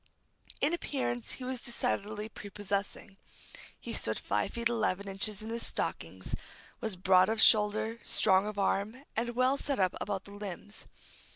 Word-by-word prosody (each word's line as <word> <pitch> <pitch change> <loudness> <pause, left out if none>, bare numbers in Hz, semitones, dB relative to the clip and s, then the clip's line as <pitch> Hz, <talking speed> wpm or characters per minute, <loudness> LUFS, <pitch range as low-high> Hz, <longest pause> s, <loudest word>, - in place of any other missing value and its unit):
In 300 +4 +3
appearance 120 - -1
he 260 - -7
was 255 -1 -3
decidedly 210 - -2
prepossessing. 200 -2 -4 0.6
He - - -5
stood - - +1
five - - -1
feet 235 -1 +1
eleven 210 -4 0
inches 200 +2 -2
in 220 - -6
his 230 0 -1
stockings; - - -2 0.5
was 220 -4 -2
broad 185 +1 +5
of 220 0 0
shoulder, 215 +1 +5
strong 190 0 +4
of 210 -1 -5
arm, 205 +6 0
and 235 +1 -1
well 255 +2 +3
set 280 -1 -1
up 185 -2 +2
about 195 -2 -2
the 200 - -11
limbs. 205 0 -6
210 Hz, 155 wpm, -32 LUFS, 195-235 Hz, 0.6 s, broad